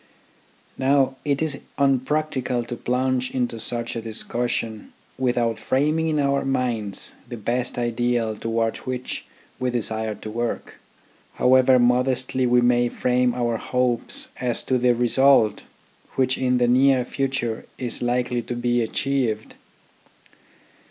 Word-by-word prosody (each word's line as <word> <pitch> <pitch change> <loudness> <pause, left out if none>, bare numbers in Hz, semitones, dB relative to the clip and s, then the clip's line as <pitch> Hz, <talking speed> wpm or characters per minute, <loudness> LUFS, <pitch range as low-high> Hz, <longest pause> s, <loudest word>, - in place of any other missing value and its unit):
Now 135 0 +2
it 145 +1 0
is 150 -3 -1 0.2
unpractical 135 -2 0
to 120 +1 -6
plunge 130 +1 0
into 120 -3 -2
such 115 +1 -4
a 115 - -3
discussion 115 0 -3 0.3
without 120 -3 0
framing 150 +7 +1
in 155 -1 0
our 140 -1 +1
own 135 - -3
minds 120 -6 -1 0.2
the 120 - -6
best 120 +3 -2
ideal 120 -1 0
towards 115 +1 -1
which 125 0 -4 0.3
we 125 - 0
desire 110 -2 -1
to 110 - -8
work, 120 +1 -4 0.6
however 130 0 +5
modestly 125 +1 +2
we 125 0 +4
may 120 0 +3
frame 125 0 +1
our 120 -2 0
hopes 125 -1 0
as 120 -2 -1
to 130 -1 +1
the 125 0 +3
result 120 -2 +4 0.5
which 130 -1 +2
in 125 -1 +1
the 120 0 +2
near 130 0 +4
future 130 -4 -2
is 125 -2 -2
likely 120 0 0
to 120 - -5
be 120 0 +1
achieved. 115 -2 -1
125 Hz, 130 wpm, -23 LUFS, 120-130 Hz, 0.6 s, however